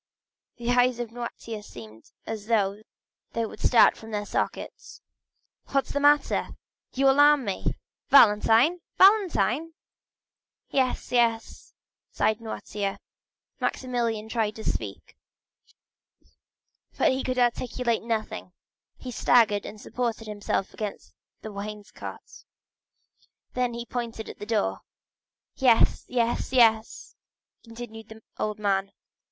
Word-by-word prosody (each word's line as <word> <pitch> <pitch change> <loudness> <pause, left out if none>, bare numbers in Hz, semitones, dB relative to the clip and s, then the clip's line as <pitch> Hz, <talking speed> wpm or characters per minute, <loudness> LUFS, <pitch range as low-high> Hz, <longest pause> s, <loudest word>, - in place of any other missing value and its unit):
The 240 0 -1
eyes 245 0 +3
of 240 -2 -5
Noirtier 230 -2 -7
seemed 110 - -13 0.2
as 215 -2 -6
though 205 -3 +1 0.5
they 230 0 0
would - - -9
start 230 -3 +5
from 225 - -12
their 210 -1 -3
sockets. - - -4 0.7
"What 275 -1 +1
is - - -8
the 285 - 0
matter? 290 +1 +2 0.4
You 270 +1 +3
alarm 290 0 +5
me. 195 -2 -2 0.3
Valentine? 230 +7 +6 0.2
Valentine?" 330 - +4 1.0
"Yes, 260 -2 0
yes," 230 -2 0 0.3
signed 220 +1 0
Noirtier. 210 -3 -4 0.6
Maximilian 235 -4 -2
tried 220 -2 -1
to 220 - -8
speak, - - -4 1.8
but - - +4
he 260 +1 -1
could 255 0 -2
articulate 240 -1 0
nothing; 220 -5 -4 0.4
he 255 - -7
staggered, 220 -3 +3
and 210 +1 -9
supported 235 0 -3
himself 205 -2 -3
against 210 -2 -6 0.3
the 220 - -7
wainscot. 205 +1 -9 1.1
Then 250 -1 -1
he 235 0 -5
pointed 235 -2 -5
to - - -8
the 205 - -10
door. 95 - 0 0.8
"Yes, 245 -4 +3
yes, 240 -1 -1
yes!" 225 -3 +2 0.5
continued 230 -1 -10
the 220 0 -13 0.2
old 215 0 -2
man. 195 -1 0
230 Hz, 115 wpm, -26 LUFS, 210-250 Hz, 1.8 s, Valentine